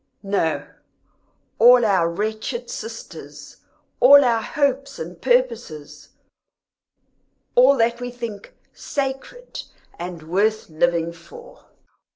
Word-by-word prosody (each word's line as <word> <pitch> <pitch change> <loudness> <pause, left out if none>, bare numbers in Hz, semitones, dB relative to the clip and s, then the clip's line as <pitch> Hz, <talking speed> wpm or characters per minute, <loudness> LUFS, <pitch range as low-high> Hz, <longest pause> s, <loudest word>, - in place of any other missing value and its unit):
"No, 195 -5 -1 0.9
all 245 +1 +7
our 185 -5 +2
wretched 215 - -4
sisters 455 - -9 0.4
all 285 0 +8
our 230 -2 +2
hopes 275 +2 -1
and 170 +2 -8
purposes 240 - -1 1.4
all 260 +3 +5
that 235 +1 +1
we 245 - -4
think 235 -4 -8 0.2
Sacred 280 - -5 0.4
and 175 -2 -7
worth 205 +7 0
living 170 +1 0
for!" 475 - -15
230 Hz, 95 wpm, -22 LUFS, 175-265 Hz, 1.4 s, all